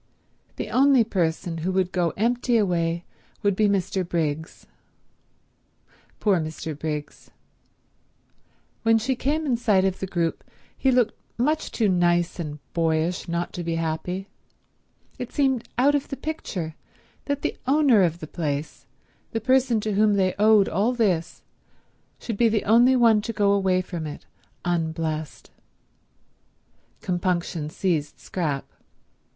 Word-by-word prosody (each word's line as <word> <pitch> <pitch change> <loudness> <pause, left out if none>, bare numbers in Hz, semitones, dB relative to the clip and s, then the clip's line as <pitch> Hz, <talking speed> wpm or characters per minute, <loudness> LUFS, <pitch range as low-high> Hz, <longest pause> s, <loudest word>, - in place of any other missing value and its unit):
The 210 - -5
only 265 +1 +5
person 170 -4 -1
who 175 +4 -1
would 185 -1 +1
go 175 -2 +1
empty 240 +2 +2
away 170 -4 0 0.4
would 200 -2 +2
be 215 +1 +3
Mr. 190 -1 0
Briggs. 160 -2 -3 1.5
Poor 200 -5 +3
Mr. 155 0 -5
Briggs. 150 0 -5 1.5
When 225 0 +4
she 250 +4 0
came 300 +6 -1
in 255 -5 +1
sight 205 -5 +3
of 190 -1 -1
the 190 - -3
group 170 -2 -1 0.3
he 270 - +1
looked 245 -3 +3 0.2
much 300 +6 0
too 220 - +1
nice 175 -1 +2
and 150 -3 -4 0.2
boyish 165 +2 0
not 170 +1 -2
to 175 - -4
be 165 0 -2
happy. 165 +4 -3 0.9
It 250 -1 -5
seemed 265 -4 0
out 275 +4 +4
of 285 -1 0
the 275 - -5
picture 190 - -4 0.5
that 285 -1 -2
the - - -1
owner 270 -6 +5
of 170 -2 +1
the - - -4
place, 150 -2 -4 0.5
the 225 - 0
person 255 0 +3
to 215 0 -2
whom 210 +1 +3
they 185 -2 +2
owed 210 -1 +5
all 210 +8 +1
this, 185 -8 0 0.7
should 225 -4 -5
be 235 0 +4
the 215 -1 0
only 240 +5 +5
one 230 -4 +5
to 230 +2 -4
go 205 -1 +2
away 190 -2 +2
from 170 -4 -5
it 145 - -8 0.4
unblessed. 160 -3 -2 1.5
Compunction 175 -3 -1
seized 155 -4 -1
Scrap. 150 -7 -3
190 Hz, 140 wpm, -24 LUFS, 165-230 Hz, 1.5 s, only